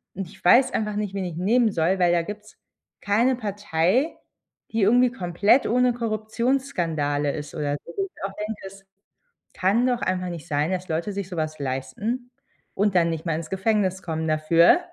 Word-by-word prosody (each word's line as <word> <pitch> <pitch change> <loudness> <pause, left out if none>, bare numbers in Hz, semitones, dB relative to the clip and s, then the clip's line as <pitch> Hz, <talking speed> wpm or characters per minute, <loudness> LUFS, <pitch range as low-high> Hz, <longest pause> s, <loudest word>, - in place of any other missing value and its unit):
Und 195 -2 -4
ich 195 - -17
weiß 245 +9 +6
einfach 210 -1 -1
nicht, 205 -2 -2
wen 190 - -2
ich 175 -3 -5
nehmen 220 +4 +3
soll, 170 +3 +1
weil 175 -1 +4
da 170 - +3
gibt's 210 +2 -9 0.4
keine 235 +6 +2
Partei, 205 - 0 0.6
die 225 -1 0
irgendwie 245 +4 +4
komplett 200 +4 +2
ohne 250 +1 +3
Korruptionsskandale 215 - -1
ist 150 +1 -7
oder 145 -2 -1
so. - - -10
Wo 390 - +1
ich 375 - -13
auch 195 0 -3
denke: 210 0 -5
„Es 195 0 -14 0.7
kann 210 +7 +2
doch 245 -1 +1
einfach 185 -1 -1
nicht 170 -1 -7
sein, 150 +3 0
dass 185 0 -3
Leute 165 +6 -2
sich 195 -2 -4
sowas 155 -4 -3
leisten 210 - -3 0.4
und 205 0 +1
dann 170 -2 +3
nicht 160 +1 -4
mal 165 - +1
ins 160 -1 -6
Gefängnis 190 -1 0
kommen 160 -1 -3
dafür.“ 155 - +5
195 Hz, 180 wpm, -24 LUFS, 165-220 Hz, 0.7 s, weiß